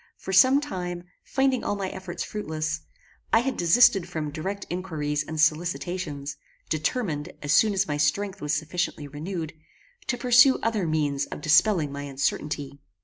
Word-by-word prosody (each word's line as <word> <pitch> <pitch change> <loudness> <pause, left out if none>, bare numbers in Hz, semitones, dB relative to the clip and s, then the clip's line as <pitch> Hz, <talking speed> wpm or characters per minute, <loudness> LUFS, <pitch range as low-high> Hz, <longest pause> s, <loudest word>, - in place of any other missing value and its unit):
For 190 - -6
some 260 +8 +6
time, 180 -11 -5 0.2
finding 265 -2 +1
all 205 - -1
my 195 -2 -3
efforts 185 -2 -5
fruitless, 155 -6 -3 0.5
I 225 - +5
had 265 +2 -2
desisted 180 +1 +4
from 150 -2 -3
direct 190 +6 -4
inquiries 155 -5 -2
and 155 +2 -6
solicitations, 160 -2 -1 0.3
determined, 155 -1 -1
as 145 +1 +1
soon 215 +4 +5
as 195 +1 +1
my 145 - -1
strength 190 +7 0
was 150 0 -2
sufficiently 155 -1 -3
renewed, 160 +3 -5 0.5
to 245 - 0
pursue 250 +2 +6
other 220 -6 0
means 145 -3 0
of - - -7
dispelling 155 0 +3
my 140 0 -5
uncertainty. 140 +1 -3
170 Hz, 150 wpm, -26 LUFS, 150-200 Hz, 0.5 s, some